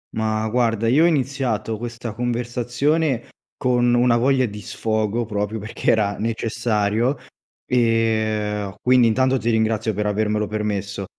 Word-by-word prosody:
Ma, 110 Hz, 0 st, -1 dB
guarda, 115 Hz, -1 st, +1 dB
io 145 Hz, +8 st, +4 dB
ho -, -, +6 dB
iniziato 130 Hz, -8 st, -1 dB
questa 120 Hz, -1 st, -6 dB
conversazione 120 Hz, +4 st, -1 dB, 0.3 s
con 120 Hz, -1 st, +2 dB
una 120 Hz, 0 st, +4 dB
voglia 130 Hz, +2 st, +3 dB
di 105 Hz, -2 st, -7 dB
sfogo, 110 Hz, +2 st, -1 dB
proprio 105 Hz, 0 st, -3 dB
perché 110 Hz, +1 st, -3 dB
era 105 Hz, -2 st, +2 dB
necessario, 115 Hz, +2 st, 0 dB, 0.5 s
e 110 Hz, -4 st, 0 dB
quindi 125 Hz, -1 st, +4 dB
intanto 130 Hz, +3 st, +2 dB
ti 120 Hz, -, -1 dB
ringrazio 110 Hz, 0 st, +1 dB
per 105 Hz, +1 st, -1 dB
avermelo 105 Hz, +1 st, 0 dB
permesso, 100 Hz, -2 st, -3 dB
115 Hz, 130 wpm, -21 LUFS, 105-120 Hz, 0.5 s, ho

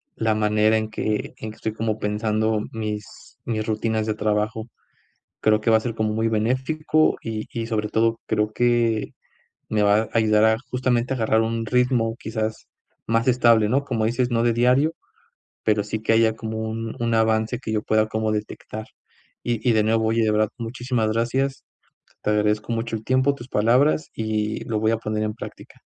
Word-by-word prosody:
la 110 Hz, -1 st, +1 dB
manera 105 Hz, +1 st, +3 dB
en 110 Hz, 0 st, -2 dB
que 110 Hz, 0 st, -2 dB
en 110 Hz, -, -6 dB
que -, -, -14 dB
estoy 110 Hz, -, -4 dB
como 110 Hz, -1 st, -2 dB
pensando 110 Hz, +1 st, 0 dB
mis 105 Hz, -2 st, -6 dB
mis 110 Hz, -2 st, -2 dB
rutinas 110 Hz, 0 st, -1 dB
de 110 Hz, -, +1 dB
trabajo. 105 Hz, +1 st, -1 dB, 0.7 s
Creo 110 Hz, 0 st, +3 dB
que 115 Hz, -, +1 dB
va 110 Hz, -, +6 dB
a -, -, -5 dB
ser 115 Hz, 0 st, -4 dB
como 110 Hz, -1 st, -1 dB
muy 110 Hz, +1 st, +1 dB
benéfico 130 Hz, +8 st, +1 dB
y 110 Hz, -1 st, -4 dB
y 115 Hz, -, -2 dB
sobre 110 Hz, -2 st, -1 dB
todo 115 Hz, +1 st, +1 dB
creo 105 Hz, 0 st, 0 dB
que 120 Hz, -2 st, +1 dB, 0.6 s
me 105 Hz, -1 st, +1 dB
va 100 Hz, 0 st, +4 dB
a -, -, -10 dB
ayudar 110 Hz, -1 st, +3 dB
a 110 Hz, 0 st, +4 dB
justamente, 125 Hz, 0 st, 0 dB
a -, -, -3 dB
agarrar 110 Hz, -1 st, +2 dB
un 115 Hz, 0 st, -1 dB
ritmo 120 Hz, -1 st, +1 dB
quizás 110 Hz, -1 st, -4 dB, 0.4 s
más 115 Hz, +2 st, +1 dB
estable, 120 Hz, -3 st, +4 dB
¿no? 135 Hz, +4 st, +2 dB
Como 115 Hz, -5 st, -1 dB
dices, 120 Hz, +2 st, 0 dB
no 115 Hz, -1 st, +2 dB
de 120 Hz, -1 st, +3 dB
diario, 125 Hz, +7 st, +3 dB, 0.7 s
pero 105 Hz, -2 st, +2 dB
sí 105 Hz, +2 st, -4 dB
que 110 Hz, -, +2 dB
haya 110 Hz, -1 st, +3 dB
como 110 Hz, 0 st, -5 dB
un 115 Hz, 0 st, -4 dB
un 115 Hz, 0 st, 0 dB
avance 110 Hz, +1 st, +1 dB
que 120 Hz, -4 st, -5 dB
yo 105 Hz, -, 0 dB
pueda 110 Hz, 0 st, +2 dB
como 110 Hz, 0 st, -1 dB
detectar. 110 Hz, 0 st, -5 dB, 0.6 s
Y 120 Hz, -, +1 dB
y -, -, +4 dB
de 110 Hz, -1 st, +3 dB
nuevo, 110 Hz, +1 st, +2 dB
oye, 115 Hz, +1 st, +2 dB
de 110 Hz, -, +2 dB
verdad, 105 Hz, 0 st, +2 dB
muchísimas 120 Hz, -1 st, -2 dB
gracias. 130 Hz, +4 st, -1 dB, 0.6 s
Te -, -, 0 dB
agradezco 105 Hz, +1 st, +1 dB
mucho 115 Hz, 0 st, -2 dB
el 110 Hz, -, -9 dB
tiempo, 130 Hz, +3 st, +2 dB
tus 125 Hz, -2 st, -11 dB
palabras, 125 Hz, +8 st, +2 dB
y 110 Hz, -1 st, -2 dB
lo 110 Hz, -2 st, -1 dB
voy 110 Hz, 0 st, +2 dB
a 115 Hz, -, 0 dB
poner 110 Hz, -1 st, -2 dB
en 105 Hz, 0 st, -2 dB
práctica. -, -, -11 dB
110 Hz, 190 wpm, -23 LUFS, 110-115 Hz, 0.7 s, va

